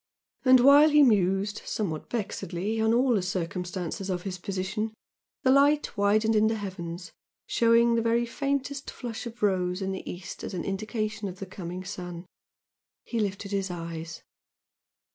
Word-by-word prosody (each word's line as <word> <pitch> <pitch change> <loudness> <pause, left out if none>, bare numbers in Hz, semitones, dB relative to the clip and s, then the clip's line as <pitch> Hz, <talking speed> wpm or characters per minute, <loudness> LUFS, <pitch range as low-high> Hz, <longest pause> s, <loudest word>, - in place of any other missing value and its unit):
And 255 -1 +7
while 285 +4 +8
he 300 -1 +6
mused, 200 -3 +2
somewhat 165 -8 -3
vexedly, 210 -1 -3
on 220 0 +3
all 245 +2 +3
the 205 - +2
circumstances 180 +1 -3
of 180 -1 -2
his 185 -2 -5
position, 195 +4 -3 0.5
the 260 - +5
light 285 +1 +4
widened 215 +2 +3
in 215 0 +4
the 225 - +1
heavens, 185 -4 -6 0.3
showing 235 0 +4
the 230 - +2
very 230 +1 +2
faintest 275 +2 -2
flush 240 -1 -6
of 235 -1 -9
rose 180 -2 +1
in 195 -1 -2
the 190 - -5
east 175 0 -8
as - - -5
an 175 - -3
indication 215 +1 -3
of 185 -1 -7
the 195 - -6
coming 180 -1 -7
sun. 180 -2 -7 0.8
He 235 - -2
lifted 200 -1 -2
his 195 -1 -1
eyes.... 165 -2 -6
200 Hz, 160 wpm, -27 LUFS, 185-230 Hz, 0.8 s, while